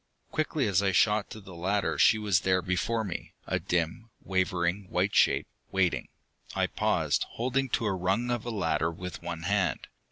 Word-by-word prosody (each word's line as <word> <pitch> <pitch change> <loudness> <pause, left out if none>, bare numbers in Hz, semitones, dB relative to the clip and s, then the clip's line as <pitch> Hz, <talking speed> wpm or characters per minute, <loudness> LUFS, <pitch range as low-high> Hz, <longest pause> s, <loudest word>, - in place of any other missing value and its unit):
Quickly 155 -3 0
as 100 -2 +3
I 95 -1 +1
shot 105 +2 +3
to 110 - -8
the 95 -3 -12
ladder 95 +4 -1
she 110 - +6
was 105 -5 +2
there 95 0 +1
before 105 +6 0
me, 95 -5 -6
a - - -1
dim, 90 +7 -2
wavering 95 0 0
white 95 +3 +1
shape, - - +4 0.3
waiting. 95 -2 +1 0.5
I - - +2
paused, - - +1
holding 130 +3 0
to 115 - 0
a 105 - +1
rung 95 +7 0
of 120 -2 0
the 120 - -5
ladder 80 -5 0
with 90 +1 -7
one 85 -1 -5
hand. 95 -2 0
95 Hz, 180 wpm, -29 LUFS, 90-110 Hz, 0.5 s, she